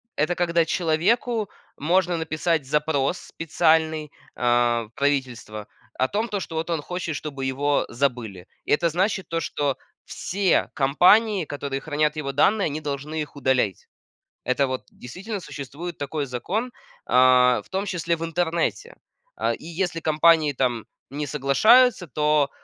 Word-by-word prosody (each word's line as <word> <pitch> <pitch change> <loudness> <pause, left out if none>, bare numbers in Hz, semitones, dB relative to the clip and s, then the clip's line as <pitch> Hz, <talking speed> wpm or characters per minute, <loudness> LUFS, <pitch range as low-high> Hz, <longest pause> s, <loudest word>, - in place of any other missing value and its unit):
это 155 +4 0
когда 170 -1 +2
человеку 200 +8 0 0.3
можно 175 +3 +1
написать 160 -1 -1
запрос 150 +2 0
специальный, 160 -2 0 0.2
а, 120 -1 +2
в 110 - -14
правительство 130 -7 -2 0.3
о 130 - +2
том, 215 +3 -1
то 205 -3 -3
что 165 - -7
вот 160 +2 -3
он 165 -3 -1
хочет, 175 -1 -4
чтобы 140 -3 -5
его 140 +2 0
забыли. 115 -8 -2 0.2
Это 170 +3 +2
значит, 190 +4 -1
то 165 - -1
что 145 -4 -2 0.3
все 190 -1 0
компании, 185 +8 +4
которые 140 -2 -4
хранят 150 0 0
его 140 -3 -3
данные, 195 +9 +3
они 155 +1 -3
должны 150 +2 -4
их 150 0 -7
удалять. 130 -8 0 0.6
Это 135 +2 +1
вот, 130 0 -4
действительно, 195 - -7
существует 160 +1 -7
такой 145 +1 -3
закон, 190 - -3 0.3
а, 125 0 +5
в - - -24
том 190 +1 -2
числе 170 -3 -1
в 165 - -6
интернете. 170 - -2 0.4
А, - - 0
и - - -10
если 170 0 -2
компании, 155 -1 +4
там, 125 -3 -1 0.2
не 145 +3 -4
соглашаются, 185 - +4
то 150 0 +2
155 Hz, 145 wpm, -24 LUFS, 135-175 Hz, 0.6 s, а